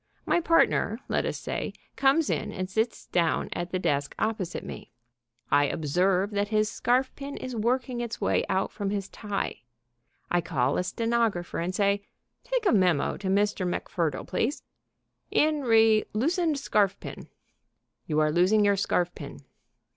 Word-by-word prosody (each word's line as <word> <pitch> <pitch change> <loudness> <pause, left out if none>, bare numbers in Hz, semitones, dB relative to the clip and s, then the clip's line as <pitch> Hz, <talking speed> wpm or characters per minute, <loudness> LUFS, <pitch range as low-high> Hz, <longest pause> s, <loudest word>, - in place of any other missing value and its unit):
My - - +3
partner, 330 0 +3
let - - 0
us - - -3
say, - - -4 0.2
comes 275 +3 +3
in - - -2
and 185 -1 -4
sits 220 +4 -1
down 170 -2 0
at 175 0 -4
the 185 - -1
desk 145 -5 -1
opposite 205 -6 -2
me. - - -9 0.6
I 145 - +5
observe 180 +7 +1
that 205 0 0
his 215 0 +1
scarfpin 265 +3 -1
is 255 -1 -5
working 245 +2 0
its 235 -1 -4
way - - +1
out 190 +1 0
from 200 -2 -3
his 200 -1 -3
tie. 205 - -4 0.7
I 175 - +3
call 140 -6 0
a - - 0
stenographer 225 -4 -1
and 180 +2 -2
say: 200 -1 +2 0.4
"Take - - -1
a - - +5
memo 180 -8 +2
to 195 - -5
Mr. 200 0 +1
MacFurdle, 170 -2 -2
please. 270 +7 -1 0.7
In 305 -1 +2
re 225 -3 +5
Loosened 320 - +1
Scarfpin. 210 -8 -1 0.8
You 155 -1 +1
are 155 0 +2
losing 190 +6 +4
your 200 -1 +3
scarfpin." 175 - -2
205 Hz, 150 wpm, -27 LUFS, 180-235 Hz, 0.8 s, I